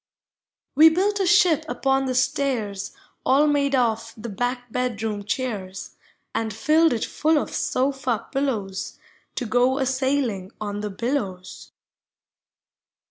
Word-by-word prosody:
We 315 +3 +8
built 400 +5 +1
a 385 - +1
ship 350 -3 +4
upon 270 0 +1
the 255 - -1
stairs 240 -7 -1 0.3
All 280 +3 +4
made 285 -2 +2
of 230 -2 0
the 230 +2 -6
back 245 +3 -3
bedroom 220 -4 -2
chairs, 200 -5 -4 0.4
And 225 -1 -1
filled 310 +9 +3
it 230 - -1
full 315 +1 +1
of - - -2
sofa 260 -4 -1
pillows 220 -9 -2 0.4
To 250 - -2
go 250 +3 +2
a 270 - +1
sailing 260 -7 -1
ou 205 -1 -4
the 210 - -3
billows. 200 -4 -4
250 Hz, 130 wpm, -24 LUFS, 215-280 Hz, 0.4 s, We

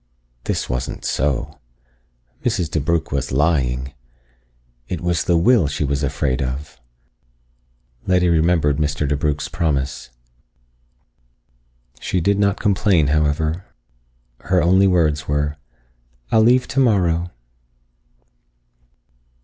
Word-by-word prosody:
This - - -2
wasn't 60 0 -4
so! 70 -1 -1 0.8
Mrs. 80 -3 -1
DeBrugh 80 +1 -1
was 70 -2 -2
lying! 65 -3 0 0.9
It 90 - -4
was 85 -1 0
the 85 - +3
will 95 -1 +4
she 75 +1 -2
was 70 0 -1
afraid 70 -2 -1
of. 65 +1 -5 1.3
Letty 90 -1 +3
remembered 80 -3 +2
Mr. 75 -1 -1
DeBrugh's 75 +1 -1
promise. 70 -6 -2 1.9
She 95 - -1
did 100 +4 +1
not 100 -1 +1
complain, 95 -7 +2
however. 75 +3 0 0.7
Her 90 -1 +1
only 95 +3 +4
words 80 -4 +1
were, 75 +1 -1 0.7
"I'll 110 - +5
leave 125 +3 +4
tomorrow." 90 -10 +1
80 Hz, 100 wpm, -20 LUFS, 70-90 Hz, 1.9 s, I'll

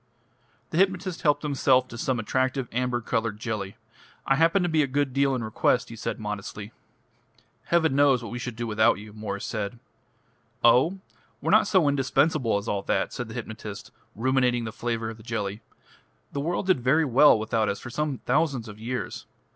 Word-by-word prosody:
The 165 - 0
hypnotist 190 -2 +1
helped 145 -2 +2
himself 130 -3 +2
to - - -9
some 125 0 -1
attractive 130 +3 -1
amber 125 0 -1
coloured 110 -1 -2
jelly. 105 -4 -4 0.5
"I - - +3
happen 165 +5 +3
to - - +1
be 160 -2 +2
a 140 - +1
good 135 0 -1
deal 140 0 +2
in 120 - -3
request," 110 +2 +1
he 115 - -8
said 115 - -4
modestly. 105 0 -6 0.9
"Heaven 160 -5 +2
knows 140 -3 +4
what 115 - -7
we 120 - -4
should 125 -1 -5
do 120 +1 -4
without 110 0 +3
you." 105 +1 -11 1.5
"Oh! 130 +11 +5 0.4
we're - - -1
not - - +5
so 185 -7 +3
indispensable 135 -3 +2
as 100 +2 -5
all 100 -2 -1
that," - - -1
said - - -4
the - - -9
hypnotist, - - -7 0.2
ruminating 125 0 +1
the 110 - -4
flavour 115 -1 -3
of 110 - -11
the - - -14
jelly. 105 -2 -3 0.7
"The 140 - -3
world 170 +5 -1
did 185 -7 +3
very 145 +6 +3
well 135 0 +6
without 110 0 0
us 100 - -2
for 120 - -9
some 150 -1 -2
thousands 135 -4 +1
of 105 0 -10
years. 120 +3 -5
125 Hz, 180 wpm, -26 LUFS, 115-145 Hz, 1.5 s, well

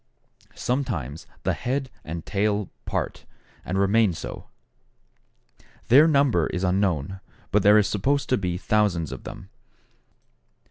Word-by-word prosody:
Sometimes 105 - -3 0.2
the - - +1
head 130 +1 -2
and 80 +1 -6
tail 105 0 0
part, - - -3 0.4
and 95 - -3
remain 100 0 +3
so. - - -7 1.4
Their 145 +6 +8
number 140 - +3
is 90 - -3
unknown, 95 -2 0 0.3
but 105 - +4
there 105 +2 +6
are 105 - +5
supposed 135 +9 0
to 130 - +3
be 90 -2 -2
thousands 95 -5 +1
of 65 - -8
them. - - -9
100 Hz, 125 wpm, -25 LUFS, 90-120 Hz, 1.4 s, Their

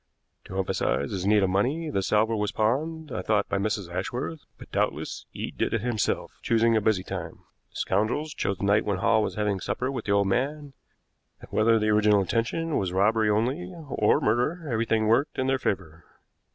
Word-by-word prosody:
To 95 - -7
emphasize 95 -6 0
his 95 -1 -2
need 105 -1 +4
of 95 - +1
money, 140 - 0
the 95 - 0
salver 110 +3 +2
was 105 -1 -1
pawned, 150 +8 -1
I - - -3
thought 105 -2 +1
by 100 - -1
Mrs. 100 -2 -1
Ashworth, 120 - -3 0.2
but - - -13
doubtless - - -2
Eade - - -6
did - - +1
it 115 - -1
himself, 115 -3 -1
choosing 115 0 +3
a 110 - +3
busy 100 -3 +1
time. - - -6 0.3
The - - -31
scoundrels 115 +10 0
chose 100 -8 -2
the - - -7
night 100 +1 +3
when 100 -2 -1
Hall 110 +3 +3
was - - -2
having 105 -2 0
supper 125 +7 -2
with 135 - -5
the 100 - -1
old 100 -1 +3
man, 140 +6 -1 0.7
and - - -14
whether 115 +1 +4
the 110 0 +1
original 105 -1 +4
intention 120 - -1
was 95 -2 -2
robbery 105 +3 +2
only 130 - 0 0.2
or 105 -4 +3
murder, 150 +10 0
everything 110 -1 +1
worked 115 +7 +2
in 130 - 0
their 135 0 +1
favor. 85 -8 -3
110 Hz, 195 wpm, -26 LUFS, 100-125 Hz, 0.7 s, need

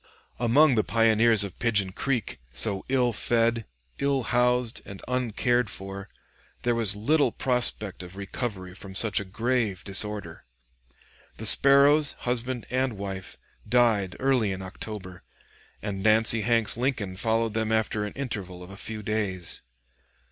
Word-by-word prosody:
Among 130 +5 +4
the 110 -3 +2
Pioneers 115 -1 +3
of 100 -3 -8
Pigeon 105 -5 +1
Creek, 120 - -3
so 95 +11 +2
ill 125 -3 +2
fed, 115 0 0 0.3
ill 140 -2 0
housed, 125 0 +1
and 100 -1 -10
uncared 125 -1 0
for, 95 0 -3 0.5
there 120 - +2
was 110 -3 +2
little 145 +9 +2
prospect 120 -7 +1
of 90 +1 -11
recovery 100 -2 -5
from 95 0 -11
such 110 +2 +2
a - - -4
grave 110 0 -2
disorder. 100 -3 -1 0.9
The - - -6
Sparrows, 140 +2 +5
husband 125 0 -3
and 130 -1 0
wife, 95 -1 -7 0.3
died 110 -6 +2
early 130 -6 +1
in 95 0 -5
October, 95 -1 -7 0.6
and 100 -2 -4
Nancy 110 +1 +5
Hanks 115 -1 +4
Lincoln 120 -7 -2
followed 110 +2 0
them 110 0 -1
after 110 -1 0
an 105 - -5
interval 95 -10 -6
of 90 - -12
a 100 - -10
few 110 +1 -6
days. 100 -5 -3
110 Hz, 140 wpm, -26 LUFS, 100-125 Hz, 0.9 s, Sparrows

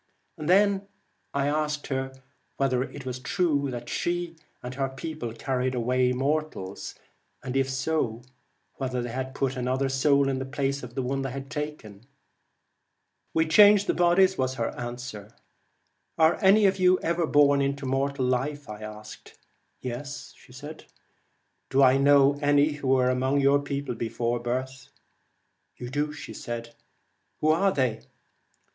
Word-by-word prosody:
I 155 - -5
then 200 +3 +3 0.5
asked 150 +1 0
her 135 -1 -3 0.5
whether 130 -2 +1
it 135 0 -6
was 125 -1 -4
true 145 -2 0
that 120 -2 -6
she 175 -1 -2 0.3
and 125 +1 -5
her 135 0 -1
people 135 -2 -6
carried 130 +2 -2
away 125 +1 +1
mortals, 135 -7 -3 0.5
and 130 0 -5
if 135 0 +1
so, 130 -4 -1 0.5
whether 130 -2 -2
they 130 +2 -4
put 135 -1 -1
another 130 +2 -1
soul 140 +1 +3
in 135 -1 -1
the 130 - -3
place 140 0 -2
of 120 0 -10
the 135 - -1
one 135 +2 -1
they 135 - -3
had 135 +2 -7
taken? 150 -10 -6 0.6
' - - -50
We 160 0 +3
change 205 +4 +7
the - - +1
bodies,' 185 +2 +3
was 130 0 0
her 115 -2 -1
answer. 120 -3 -7 0.4
' - - -48
Are 160 0 +4
any 200 +2 +6
of 195 0 +2
you 185 0 +4
ever 170 0 0
born 145 -1 +4
into 140 0 -1
mortal 135 0 0
life?' 145 +4 -1 1.2
'Yes.' 130 +3 -6 1.4
'Do 135 +1 +4
I 130 0 +6
know 140 0 +5
any 145 +1 +4
who 145 -2 -5
were 130 -1 +3
among 130 +2 +1
your 140 +1 +4
people 140 -2 -3
before 115 +1 -2
birth? 130 +2 -4 0.5
' - - -48
'You 120 0 -7
do.' 145 +2 -1 1.3
'Who 155 - +1
are 190 +5 +3
they?' 125 -8 0
135 Hz, 145 wpm, -26 LUFS, 125-150 Hz, 1.4 s, change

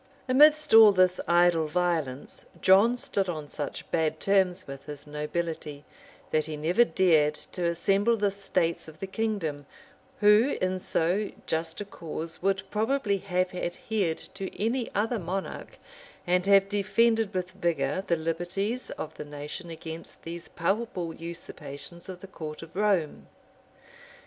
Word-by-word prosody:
] - - -31
Amidst 300 +3 +5
all 220 -2 +10
this 185 -1 +3
idle 170 -2 +4
violence, 160 -5 -2
John 205 +6 +5
stood 195 -5 -1
on 155 -4 -5
such 145 - -5
bad 160 -2 0
terms 190 -2 +2
with 135 0 -9
his 145 -1 -7
nobility, 150 0 -4 0.5
that 155 0 +1
he 155 -1 -5
never 175 +10 +4
dared 160 -9 +3
to 175 +3 -5
assemble 195 +7 +2
the 205 -1 +1
states 180 -5 -1
of 155 -1 -12
the - - -3
kingdom, 190 -9 -3 0.5
who, 210 +6 +5
in 185 0 0
so, 185 +4 0 0.2
just 160 +3 -2
a - - -4
cause, 165 -3 -6
would 195 +1 +1
probably 215 -1 +1
have 185 -1 -1
adhered 180 0 -2 0.2
to 195 -1 -5
any 230 +3 0
other 220 +3 0
monarch, 190 +2 -5 0.5
and 180 +1 +1
have 195 -1 +6
defended 210 +2 +2
with 185 0 -2
vigor 170 -3 -1
the 170 - +3
liberties 175 +9 -2
of 155 - -6
the - - -5
nation 150 +4 -7
against 160 0 -9
these 170 +1 -7
palpable 180 -2 -2
usurpations 165 0 -8
of 180 -1 -8
the - - -8
court 155 -4 -7
of 165 +1 -14
Rome. 195 -7 0
180 Hz, 145 wpm, -28 LUFS, 160-200 Hz, 0.5 s, all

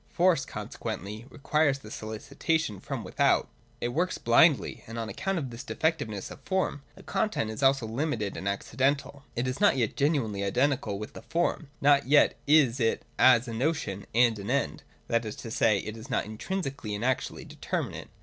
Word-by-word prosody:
Force 175 -5 +3
consequently 105 +6 -6
requires 145 -1 +1
solicitation 110 - -2
from - - -5
without: - - +2 0.3
it 120 - -1
works 175 +9 0
blindly: 130 +6 +4
and 115 +1 -7
on 115 -1 -3
account 195 - -2
of 135 -6 -3
this 115 +3 -7
de - - -6
fectiveness 115 -12 -1
of - - -10
form, 190 -6 -1
the - - -14
content 210 - -1
is 110 - -6
also 135 -3 +4
limited 115 -3 -2
and 100 - -5
ac 100 0 0
cidental. 140 +2 0
It 120 +2 -1
is 130 +8 -3
not 205 -9 +5
yet 115 -4 0
genuinely 130 -9 +1
identical 125 0 +1
with 105 +1 -7
the - - -9
form: 165 -3 -1
not 140 -1 +4
yet 145 +1 +5
is 140 -4 +5
it 115 -2 +1 0.2
as 125 -1 +6
a 115 - -5
notion 120 -6 -2
and 115 -2 +4
an 100 +2 -6
end; 140 +2 0 0.3
that 115 0 +1
is 110 -2 -5
to 115 - -8
say, 110 -2 +3
it 110 +2 -5
is 115 +4 -10
not 125 - 0
intrinsically 135 - -4
and 105 +4 -3
actually 130 0 -1
determinate. - - -4
130 Hz, 185 wpm, -28 LUFS, 110-145 Hz, 0.3 s, as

